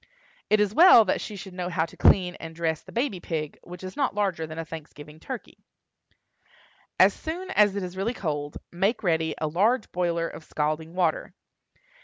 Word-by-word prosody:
It 215 - +4
is 210 -1 +2
well 320 -7 +8
that 185 - 0
she 210 - -6
should 190 -1 -9
know 180 -1 -3
how 165 -2 0
to - - -14
clean 180 -2 +4
and 165 0 -8
dress 160 -2 -1
the - - -14
baby 235 -6 -1
pig, 155 -3 -4
which 180 +1 -11
is 185 - -7
not 275 -7 0
larger 190 -6 -1
than 155 +1 -8
a 165 - -4
Thanksgiving 150 -1 -10
turkey. 255 +6 -8 1.4
As - - +7
soon 360 +4 -6
as 205 - +4
it 200 - -2
is 180 0 -6
really 210 +6 -2
cold, 145 -6 -3
make 195 +7 0
ready 160 -3 +1
a 155 - -2
large 210 +10 +1
boiler 170 -2 0
of 165 - -9
scalding 155 +2 -2
water. - - 0
180 Hz, 190 wpm, -26 LUFS, 160-210 Hz, 1.4 s, well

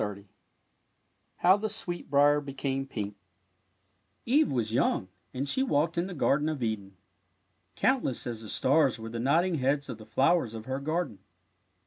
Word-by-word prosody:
I - - +2
^ 100 -1 -6 1.1
HOW 185 +2 +5
THE 215 +1 -2
SWEETBRIER 145 -8 +1
BECAME 135 -1 -3
PINK 105 -5 -5 1.1
Eve 290 +6 +3
was 115 -4 -1
young, 95 -5 +1 0.2
and 135 +2 -3
she 260 - +2
walked 165 - +1
in 170 +2 0
the 185 - -7
Gar 140 0 +2
den 150 +1 -1
of 150 -5 -3
Eden. 100 -4 -3 0.8
Countless 255 - +1
as 115 -2 -4
the 110 - -9
stars 140 +2 +3
were 115 0 -7
the 115 +1 -5
nodding 165 +7 +2
heads 140 +2 0
of 115 -3 -6
the 110 - -12
flowers 135 -5 +2
of 110 -1 -7
her 130 +1 -3
garden. 155 - -2
140 Hz, 165 wpm, -29 LUFS, 115-165 Hz, 1.1 s, HOW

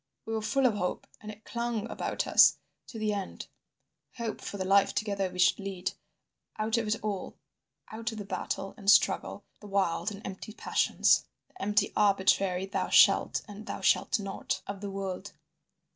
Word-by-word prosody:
We 225 - -4
were 220 - -1
full 255 +5 +1
of 245 - +4
hope, 180 -3 -3 0.2
and 210 - -9
it 215 +1 -15
clung 235 -2 -3
about - - -3
us - - +6 0.3
to 235 - -9
the 215 -1 0
end, 200 -2 -5 0.7
hope 230 -3 -4
for 200 - -6
the 190 - -3
life 195 +1 +4
together 200 -3 -1
we 180 - -10
should 180 +3 +4
lead, 195 -2 -3 0.7
out 215 +1 0
of 225 - -3
it 210 - +2
all, 205 -3 -4 0.6
out 225 +1 -4
of 220 - -8
the 205 - -6
battle 195 0 -4
and 200 -3 -1
struggle, 205 - +3 0.2
the 210 - -11
wild 195 -2 0
and 205 0 -10
empty 195 +2 -7
passions, - - +2 0.2
the - - -14
empty 205 +1 +1
arbitrary 195 -2 +2
'thou 195 - -2
shalt' - - +5
and 210 +2 -10
'thou - - -5
shalt - - +2
not' 195 -1 -4
of 200 -1 -6
the 205 - -4
world. 195 -2 -5
205 Hz, 180 wpm, -29 LUFS, 195-215 Hz, 0.7 s, us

